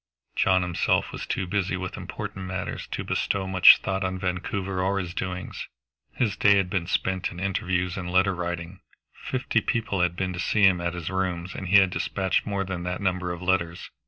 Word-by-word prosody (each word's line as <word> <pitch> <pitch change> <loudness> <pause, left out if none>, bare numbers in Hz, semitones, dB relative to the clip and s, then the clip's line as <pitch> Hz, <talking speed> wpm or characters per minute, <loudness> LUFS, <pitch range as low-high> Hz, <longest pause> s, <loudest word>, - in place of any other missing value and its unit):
John 95 -1 +3
himself 90 -1 +1
was - - -6
too 95 - -1
busy 95 0 -1
with 90 -1 -5
important 95 -1 -6
matters 90 -1 -4
to - - -4
bestow 100 -1 -1
much 95 -1 +8
thought 95 0 -1
on 95 0 -2
Vancouver 95 +1 -2
or 95 +2 +1
his 90 -3 -3
doings. 90 0 -5 0.5
His 110 -6 0
day 100 -1 +5
had 95 -2 0
been 85 -3 -1
spent 95 0 0
in 90 - -8
interviews 90 -1 -1
and 90 -2 -4
letter 95 +1 +3
writing; 90 +1 -4 0.3
fifty 125 -3 -1
people 110 -7 -1
had 90 -1 +1
been 90 0 -2
to 90 - -6
see 105 +3 +1
him 95 -3 +5
at 85 0 -2
his 90 0 -4
rooms, 90 -2 -2
and 95 - -6
he 95 - +3
had 95 -2 +5
dispatched 95 +1 -1
more 100 -1 -1
than 95 -2 -4
that 90 +1 -3
number 90 -2 -1
of 85 +1 -6
letters. 90 -2 -1
95 Hz, 200 wpm, -26 LUFS, 90-95 Hz, 0.5 s, much